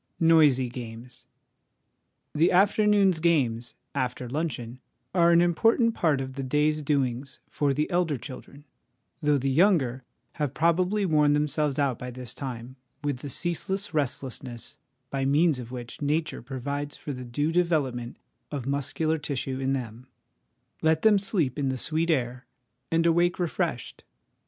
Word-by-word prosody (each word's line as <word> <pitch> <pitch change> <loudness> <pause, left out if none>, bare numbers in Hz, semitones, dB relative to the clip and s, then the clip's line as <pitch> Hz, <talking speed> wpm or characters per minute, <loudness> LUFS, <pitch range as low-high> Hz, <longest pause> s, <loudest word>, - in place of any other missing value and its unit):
Noisy 155 -6 +5
Games. 120 0 -8 1.1
The 160 +3 +3
afternoon's 200 -1 +4
games, 130 -9 +1 0.2
after 125 -2 -2
luncheon, 125 -4 -4 0.3
are 170 -2 +5
an 170 0 +6
important 225 +7 +3
part 155 -8 +1
of 130 0 -5
the 135 - -5
day's 150 +3 +1
doings 135 -2 -1
for 145 -2 +1
the 150 +3 0
elder 175 -5 +1
children, 135 +4 -10 0.6
though 150 -1 +3
the 135 0 -1
younger 135 - +3 0.4
have 140 -2 -1
probably 180 +5 +2
worn 150 -4 +3
themselves 150 -1 0
out 140 -5 0
by 125 - -5
this 125 -1 -7
time 130 -1 -7 0.3
with 145 -3 -1
the 140 +3 -7
ceaseless 180 +6 -2
restlessness 130 -4 -2 0.4
by 135 -1 -1
means 145 +1 +3
of 120 -1 -8
which 120 +1 -8
Nature 155 +2 -1
provides 140 +3 -4
for 145 - -6
the 125 -1 -7
due 145 +6 -1
development 145 -9 0 0.3
of 140 -5 -4
muscular 145 +3 -1
tissue 135 -3 -3
in 135 0 0
them; 125 -1 -5 0.7
let 160 0 +2
them 210 -2 +6
sleep 170 - 0
in 135 -2 0
the 130 - -2
sweet 160 +5 0
air, 125 -5 -1 0.4
and 165 0 +2
awake 175 +2 +3
refreshed. 170 -6 -3
145 Hz, 145 wpm, -27 LUFS, 130-165 Hz, 1.1 s, an